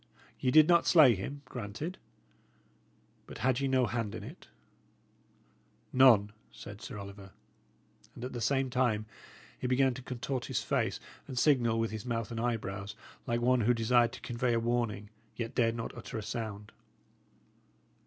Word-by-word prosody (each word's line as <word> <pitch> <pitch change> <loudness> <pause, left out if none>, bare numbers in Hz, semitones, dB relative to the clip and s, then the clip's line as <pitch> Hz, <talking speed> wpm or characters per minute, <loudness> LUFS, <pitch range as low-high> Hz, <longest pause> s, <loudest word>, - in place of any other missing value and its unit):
Ye 130 - +1
did 155 +3 +7
not 170 -1 +4
slay 150 -8 +7
him; 140 +9 -6
granted. 125 - -6 1.3
But - - -9
had 130 -1 +2
ye 140 - 0
no 130 -1 +3
hand 115 -2 -3
in - - -7
it?" - - -11 1.5
"None," 115 -6 +6 0.2
said 105 0 -10
Sir - - -7
Oliver. 100 -1 -10 0.8
And - - -9
at 130 - -6
the 120 - -4
same 135 +2 +1
time 120 -4 +1 0.5
he - - -2
began 130 +1 +3
to 130 - -8
contort 125 0 -4
his - - -2
face, - - 0 0.3
and 130 - -7
signal 120 -5 +3
with 115 -1 -1
his 110 +2 -6
mouth 115 -1 -2
and 115 - -4
eyebrows, 105 -4 -3 0.3
like 120 0 0
one 125 0 +3
who 120 +3 +3
desired 120 +1 +3
to - - -9
convey 120 0 -1
a 115 - +2
warning, 115 -3 -1 0.2
yet 115 -1 -4
dared 115 -2 +2
not 115 -1 -5
utter - - -7
a 110 - -4
sound. 110 -2 -5
120 Hz, 165 wpm, -31 LUFS, 110-130 Hz, 1.5 s, did